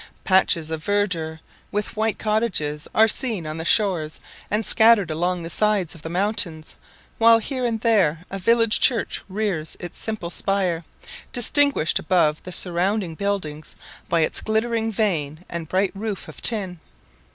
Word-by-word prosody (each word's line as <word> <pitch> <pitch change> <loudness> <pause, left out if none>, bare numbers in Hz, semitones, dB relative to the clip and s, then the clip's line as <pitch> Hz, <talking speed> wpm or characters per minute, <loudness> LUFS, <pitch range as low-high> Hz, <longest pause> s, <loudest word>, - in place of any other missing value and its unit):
Patches 175 -4 +2
of 160 -1 -4
verdure, 170 -6 -1 0.3
with 205 0 -3
white 220 0 0
cottages, 205 -10 -1
are 220 +1 +6
seen 225 -7 -2
on 155 +1 -5
the 160 - -4
shores 175 -7 +1 0.3
and 210 +1 -1
scattered 220 -6 +5
along 175 +2 -1
the 165 - -6
sides 210 -4 +1
of 165 - -13
the 160 - -6
mountains; 175 -4 0 0.4
while 230 0 +7
here 255 +3 -4
and 225 -2 -1
there 185 -8 +2
a 195 - -4
village 230 +2 +3
church 235 -5 +1
rears 190 -6 -3
its 175 -2 -8
simple 215 -6 -4
spire, 185 -4 0 0.5
distinguished 270 - +2
above 160 -3 +1
the 185 - -9
surroundings 180 0 -1
buildings 180 -7 -3 0.3
by 170 -1 +2
its 155 - 0
glittering 225 +1 0
vane 175 -6 -1
and 170 -2 -6
bright 190 +1 +1
roof 205 0 -5
of - - -11
tin. 190 -7 0
190 Hz, 150 wpm, -22 LUFS, 165-220 Hz, 0.5 s, while